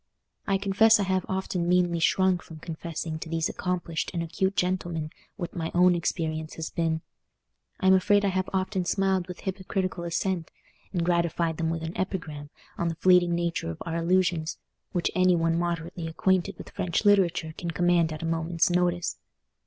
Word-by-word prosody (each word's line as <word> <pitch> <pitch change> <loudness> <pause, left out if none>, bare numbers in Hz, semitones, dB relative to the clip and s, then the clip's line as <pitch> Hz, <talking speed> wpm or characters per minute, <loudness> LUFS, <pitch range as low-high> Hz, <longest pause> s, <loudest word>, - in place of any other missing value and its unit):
I 195 -1 +3
confess 205 +3 +4
I - - +2
have 185 -1 0
often 185 -2 -1
meanly 175 -1 +3
shrunk 185 +1 +3
from 160 - -11
confessing 160 0 -5
to 160 - -7
these 165 0 0
accomplished 175 -3 -2
and 170 - 0
acute 190 +4 -1
gentlemen 175 -4 -1 0.2
what 175 -5 -6
my 165 -2 -2
own 180 0 +6
experience 160 -2 -2
has 160 -1 -5
been. 160 -1 -1 0.8
I - - -3
am 190 - +7
afraid 205 +2 +4
I - - +3
have 185 0 -1
often 190 0 0
smiled 190 0 +1
with 180 -1 -8
hypocritical 190 -1 -3
assent, 170 0 -1 0.4
and 175 -3 -1
gratified 170 -2 +1
them 160 -1 0
with 165 0 -3
an 165 +2 -5
epigram 155 -6 -4 0.3
on 170 - +1
the 165 - -2
fleeting 180 -1 +4
nature 170 - -1
of 85 - -5
our 165 - -3
illusions, 170 -1 +1 0.3
which 175 - 0
any 185 -1 +4
one 165 -1 +1
moderately 170 0 -2
acquainted 190 +3 +1
with - - -10
French 180 +1 -1
literature 180 -6 +3
can 170 - -5
command 170 0 +2
at 155 +1 -5
a - - -2
moment's 165 +1 +1
notice. 175 -1 0
175 Hz, 175 wpm, -27 LUFS, 165-185 Hz, 0.8 s, am